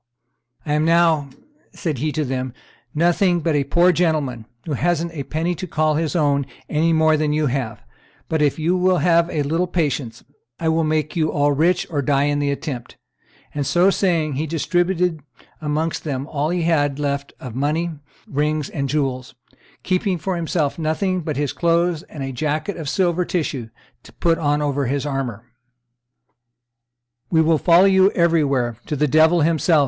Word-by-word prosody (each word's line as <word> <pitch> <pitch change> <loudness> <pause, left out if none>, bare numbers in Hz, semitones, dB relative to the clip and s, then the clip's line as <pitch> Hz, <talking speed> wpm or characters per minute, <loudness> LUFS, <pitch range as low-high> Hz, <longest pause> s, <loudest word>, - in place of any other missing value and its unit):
"I 150 - -1
am 150 +1 +2
now," 165 -3 +3 0.4
said 155 -9 -3
he 155 +3 -1
to 155 - -1
them, 130 -1 -3 0.4
"nothing 175 +2 +2
but 165 0 0
a 145 -1 +2
poor 170 +6 +3
gentleman, 150 -10 -1 0.2
who 155 - -3
hasn't 170 +3 0
a 150 - -4
penny 160 +6 -2
to 185 +2 -6
call 155 -1 +1
his 160 +2 -1
own 140 -4 +1 0.2
any 160 +2 +1
more 160 -1 +4
than 150 -1 0
you 155 0 +1
have; 125 -5 -3 0.4
but, 160 -1 -1
if 145 -2 +2
you 165 +3 +1
will 185 0 +2
have 170 +1 +3
a 150 - -1
little 165 +5 0
patience, 145 -9 -2 0.4
I 160 - 0
will 160 0 +2
make 155 -1 -1
you 155 -2 +1
all 145 0 +2
rich 170 +5 +2
or 145 -3 0
die 140 0 +2
in 145 0 +1
the 145 -1 0
attempt;" 140 -4 -5 0.6
and, 145 - -1
so 175 +7 +3
saying, 165 -7 +1
he 150 +4 -2
distributed 175 +1 0 0.4
amongst 155 +2 -2
them 135 -3 -3
all 150 0 -2
he 175 0 -1
had 145 -4 +1
left 140 -1 -2
of 125 -3 -8
money, 155 +6 -1 0.3
rings, 150 +1 -1
and 140 -1 -3
jewels, 130 -4 -2 0.5
keeping 185 0 0
for 180 +3 -3
himself 165 -3 -1
nothing 180 +4 0
but 155 -3 -4
his 145 -2 -1
clothes 170 -1 +1
and 145 - -7
a 135 - -4
jacket 155 +7 -2
of 160 -5 -5
silver 180 0 +1
tissue 145 -10 -3 0.3
to - - -17
put 165 -1 +1
on 145 -1 +1
over 140 -2 -1
his 140 +2 -1
armor. 135 -6 -3 1.9
"We 160 - +2
will 160 -1 +3
follow 175 +2 +5
you 190 0 +5
everywhere, 140 - +1
to 150 - -2
the 150 +1 +1
devil 160 +4 +4
himself!" 160 +1 +3
155 Hz, 175 wpm, -21 LUFS, 145-170 Hz, 1.9 s, follow